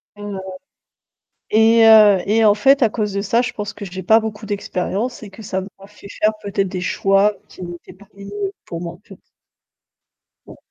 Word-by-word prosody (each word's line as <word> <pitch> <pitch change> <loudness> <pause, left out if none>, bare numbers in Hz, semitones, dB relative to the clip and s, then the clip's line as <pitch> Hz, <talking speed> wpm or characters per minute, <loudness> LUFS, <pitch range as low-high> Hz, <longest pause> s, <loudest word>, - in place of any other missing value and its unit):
Heu, 205 -1 -7 1.1
et 225 +1 +5
heu, 215 -3 +7
et 220 +2 +2
en 210 - +6
fait, 270 +7 +3
à 230 - +3
cause 210 -2 -3
de 200 - -1
ça, 225 +4 +1
je 245 - -3
pense 205 -1 -6
que 210 - -9
j'ai 185 0 -7
pas 220 +5 +5
beaucoup 220 -1 -6
d'expérience, 205 +3 -3
et 205 - -9
que 195 +3 -13
ça 190 -2 -3
m'a 195 0 -13
fait 210 -1 -15
faire, 215 - +4
peut-être, 200 -1 -2
des 180 0 -5
choix 195 +2 +2
qui 185 - -11
n'étaient 175 +1 -10
pas 195 +2 -19
les 200 0 -12
mieux 200 0 -5
pour 170 -1 -7
moi, 170 -1 -6
en - - -19
fait. - - -15 1.3
Ouais. - - -14
205 Hz, 200 wpm, -19 LUFS, 195-215 Hz, 1.3 s, heu